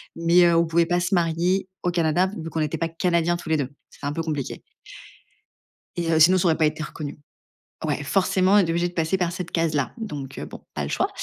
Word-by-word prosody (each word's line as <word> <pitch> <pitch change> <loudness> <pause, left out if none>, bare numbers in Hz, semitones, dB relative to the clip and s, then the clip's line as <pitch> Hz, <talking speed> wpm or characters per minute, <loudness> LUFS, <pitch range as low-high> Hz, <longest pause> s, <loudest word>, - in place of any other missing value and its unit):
Mais 170 +1 +4
heu, 170 -1 +4
on 170 - +4
pouvait 165 +1 +2
pas 175 0 +1
se 180 +3 -1
marier 175 +2 +1 0.2
au 180 - +1
Canada 175 +1 +2
vu 160 - -5
qu'on 160 - -3
n'était 155 +1 -2
pas 165 0 -1
canadiens 170 0 +1
tous 170 - -9
les 160 - +3
2. 135 -3 -2 0.2
C'était 140 - -7
un 145 - -2
peu 165 +1 -2
compliqué 150 -5 -4 1.4
et 170 -1 -1
heu 160 - +3
sinon, 180 +4 +7
ça 180 - +2
aurait 160 - +3
pas 160 - +3
été 155 +1 -1
reconnu. 150 -1 -7 0.7
Ouais, - - -1
forcément, 190 +4 +2
on - - +7
était 180 -5 +3
obligés 170 +1 +1
de - - -11
passer 165 +2 +1
par 175 -2 0
cette 175 -1 -5
case-là. 155 -4 0
Donc 145 - -6
heu, - - -5
bon, - - -10
pas - - -2
le - - -4
choix - - +1
165 Hz, 240 wpm, -24 LUFS, 160-175 Hz, 1.4 s, sinon